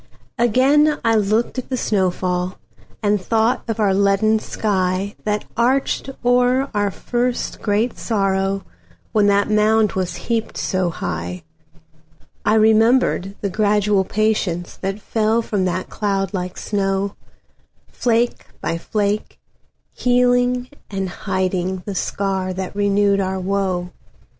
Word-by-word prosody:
Again 275 +6 +4
I 225 - +4
looked 220 +4 +1
at 255 - -7
the 260 - -1
snow 195 -6 +1
fall, 180 0 -2 0.5
And 205 -1 +2
thought 225 +5 +1
of 225 - -2
the 205 -3 +2
leaden 200 +2 +3
skyThat 200 +1 -1
arched 260 +4 +1 0.2
o'er 250 +2 +3
our 205 -1 +1
first 245 +5 -2
great 215 +3 0
sorrow, 195 -2 0 0.5
When 210 -2 +3
that 200 +1 +2
mound 215 0 +3
was 180 -2 -2
heaped 225 +5 -2
so 185 -2 0
high.I 160 +2 -6
remembered 220 -2 +3
the 200 - -1
gradual 205 0 +2
patienceThat 195 -2 -1
fell 220 +2 +1
from 200 -4 -1
that 185 +1 -2
cloud 195 -2 -1
like 180 -1 -4
snow, 195 -1 -1 0.7
Flake 235 0 0
by 165 - -2
flake, 210 +2 -2 0.5
healing 245 0 +2 0.2
and 195 -2 -3
hidingThe 185 0 -2
scar 190 -1 -1
that 190 +1 -5
renewed 200 0 +2
our 190 0 -1
woe. 185 -2 -1
200 Hz, 115 wpm, -20 LUFS, 190-225 Hz, 0.7 s, Again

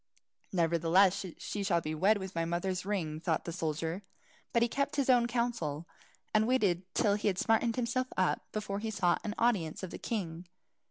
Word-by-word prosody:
"Nevertheless 170 +2 +3
she 205 - -4
shall 185 -4 +2
be 155 -1 -4
wed 195 +7 +3
with 190 -1 -6
my 165 - 0
mother's 180 +2 -2
ring," 165 -7 -2
thought 165 -1 -1
the 170 - -3
soldier. 165 +2 -2 0.5
But 235 - +3
he - - +3
kept 280 +4 -1
his 275 -3 +3
own 240 -1 +4
counsel, 230 -11 -2 0.5
and 215 0 +4
only 255 +3 +3
waited 185 -6 0
till 205 -3 +3
he 210 +1 -1
had 190 -3 +1
smartened 225 +2 +2
himself 255 +1 0
up, 185 -1 +2
before 205 -2 -3
he 220 +1 -3
sought 190 -5 +1
an 210 -1 -3
audience 200 -9 +1
of 185 - -5
the - - -7
king. 175 -6 -4
195 Hz, 195 wpm, -32 LUFS, 170-225 Hz, 0.5 s, own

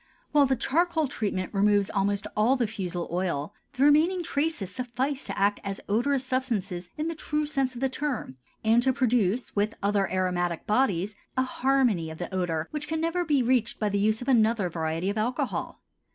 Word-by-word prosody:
While 290 -2 +5
the 265 - +2
charcoal 320 +5 +1
treatment 200 -6 -3
removes 205 0 +3
almost 200 0 0
all 225 +5 +4
the 250 -3 +1
fusel 180 -5 -4
oil, 175 -2 -2 0.2
the 260 - +1
remaining 320 +5 +4
traces 285 - -2
suffice 255 +4 -2
to - - -5
act 205 +1 +2
as 200 -1 -4
odorous 255 +6 +1
substances 210 -9 -2
in 305 +1 -1
the 330 - -2
true 300 -1 -2
sense 270 -3 -1
of 240 - -7
the 270 - +3
term 265 - -3 0.3
and 225 +2 +4
to 260 +1 +2
produce 245 -3 +1
with 210 +2 0
other 200 -1 +1
aromatic 180 -2 -1
bodies 210 -4 +1 0.2
a 260 - +4
harmony 255 -10 +1
of 160 - -8
the 175 +2 -6
odor 165 -3 -1
which 300 0 -4
can 320 +1 -2
never 335 +2 0
be 290 -6 +2
reached 240 -1 +1
by 210 - +1
the 200 0 0
use 215 +3 +1
of - - -11
another 225 -6 +3
variety 165 +3 -1
of 210 - -3
alcohol. 245 +4 -2
225 Hz, 190 wpm, -27 LUFS, 195-270 Hz, 0.3 s, While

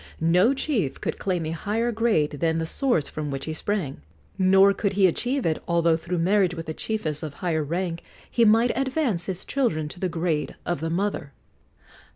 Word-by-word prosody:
No 180 +11 +4
chief 225 - -1
could - - -3
claim 180 -4 -1
a 155 - -3
higher 215 +8 -1
grade 220 -10 +1
than 165 -1 +1
the 165 - -1
source 240 - 0
from 150 -1 -4
which 135 -1 -4
he 160 - -3
sprang; 160 - -2 0.3
nor 190 +1 +5
could 200 0 -1
he 195 -1 +4
achieve 250 - 0
it, 160 -1 0
although 170 -1 +3
through 170 +2 -3
marriage 185 +1 +2
with 165 -1 -7
a 160 - -3
chiefess 160 -7 -3
of 150 -3 -6
higher 160 -3 -1
rank 170 +2 -2 0.3
he 235 - +2
might 225 +2 +4
advance 265 - -1
his 190 -1 -4
children 170 - 0
to 175 - -10
the 185 - -1
grade 165 -2 -1
of 175 -4 -1
the 160 +2 -2
mother. 170 -5 -2
175 Hz, 190 wpm, -25 LUFS, 160-210 Hz, 0.3 s, nor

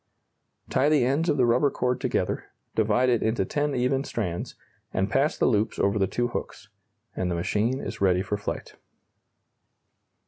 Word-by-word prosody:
Tie 135 +3 +2
the 150 -5 +4
ends 145 +7 +1
of 145 - +2
the 125 - +4
rubber 125 +5 +3
cord 125 -1 -1
together, - - -1 0.3
divide 110 +3 +2
it 120 -3 +2
into 110 +2 +1
ten 145 -2 -1
even 130 +2 +1
strands, 90 -11 -4 0.4
and 95 +1 -1
pass 140 +3 +2
the - - +2
loops 110 -2 +1
over 100 +2 +1
the 95 - +2
two 120 +5 -1
hooks 105 -3 -6 0.5
and 90 - -1
the 85 - -1
machine 110 +9 0
is - - -6
ready 95 -1 +3
for 105 +1 -2
flight. 100 - -5
120 Hz, 170 wpm, -26 LUFS, 100-135 Hz, 0.5 s, the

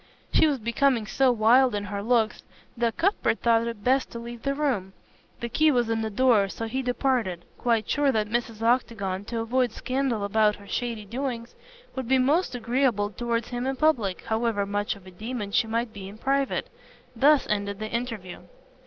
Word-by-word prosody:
She - - +5
was 290 -3 +1
becoming 235 0 +1
so 265 +4 +3
wild 240 +2 +4
in 205 - -2
her 200 0 -4
looks 225 -1 +1 0.3
that 230 -1 -1
Cuthbert 355 - +1
thought 230 0 +3
it 230 -3 -6
best 265 +2 +2
to - - -8
leave 235 0 -8
the 275 0 -1
room. 245 -11 -1 0.5
The 235 - -2
key 310 +7 +3
was 240 -5 +2
in 225 0 0
the 220 - -2
door, 215 -3 +3
so 225 - -5
he 255 +4 -2
departed, 245 -8 -1
quite 230 -3 +1
sure 285 -1 +2
that 215 -3 0
Mrs. 230 0 -2
Octagon, 205 -5 0
to 230 +1 -3
avoid 245 +1 +1
scandal 255 -3 -1
about 210 +1 +2
her 200 - -15
shady 230 -2 -3
doings, 240 +1 -4 0.4
would 260 -3 -4
be 265 +1 +4
most 275 +2 +2
agreeable 235 -4 +1
towards 235 +2 -2
him 245 +1 -3
in 270 - -1
public, 245 - +1
however 220 -2 0
much 205 +1 -1
of 200 -2 -16
a 185 - -11
demon 215 +2 -5
she 225 - +2
might 230 0 -2
be 195 -2 -8
in 205 - -11
private. 275 +3 -1 0.4
Thus 285 +4 +5
ended 200 -1 -1
the 215 +1 -5
interview. 230 -7 -4
235 Hz, 190 wpm, -26 LUFS, 210-255 Hz, 0.5 s, She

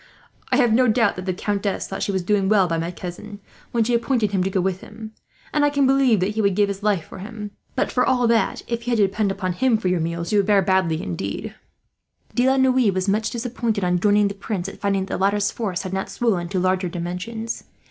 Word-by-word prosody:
I - - +4
have 240 -5 +4
no 250 +2 +4
doubt 225 -2 +3
that 185 +1 -6
the - - +2
countess 200 +2 -2
thought 195 - -5
she - - 0
was 190 -2 -1
doing 195 0 +1
well 200 -4 +4
by 165 -1 -1
my 165 +1 -2
cousin, 180 +4 -8 0.3
when 235 -1 +2
she 240 +2 0
appointed 235 -3 +1
him 190 -2 +1
to 190 - 0
go 190 - 0
with 185 0 -1
him, 220 0 -10 0.4
and 295 - +2
I 290 - +4
can 285 -1 +2
believe 260 -6 +3
that 190 +3 +1
he 220 +1 -1
would 200 -2 +2
give 205 0 +3
his 200 0 -4
life 205 -5 +1
for - - -11
him; 210 +1 -7 0.2
but - - 0
for 250 - +2
all 250 -2 +2
that, 230 -1 +1
if 235 0 -4
you - - +1
had - - +2
to 205 - +5
depend 200 +1 0
upon 185 -2 -2
him 235 +5 +2
for 190 -4 -1
your 180 -1 +1
meals, 170 +1 -3
you 205 - +5
would 200 - +1
fare 200 -2 +4
badly, 185 -4 +1
indeed." 90 +2 -4 0.8
De 250 +2 +3
la 265 - +3
Noue 260 -4 +4
was 185 +1 -2
much 215 +2 +1
disappointed, 235 -3 -2
on 180 0 +1
joining 205 +1 +3
the 200 - -3
Prince, 195 -2 -4
at 195 - -10
finding 195 -1 0
that - - -6
the - - 0
latter's 200 +1 +2
force 195 -6 -3
had 190 -1 -5
not 190 0 -2
swollen 190 -8 0
to 190 0 -1
larger 185 0 +1
dimensions. 180 +7 -5
200 Hz, 255 wpm, -22 LUFS, 185-230 Hz, 0.8 s, to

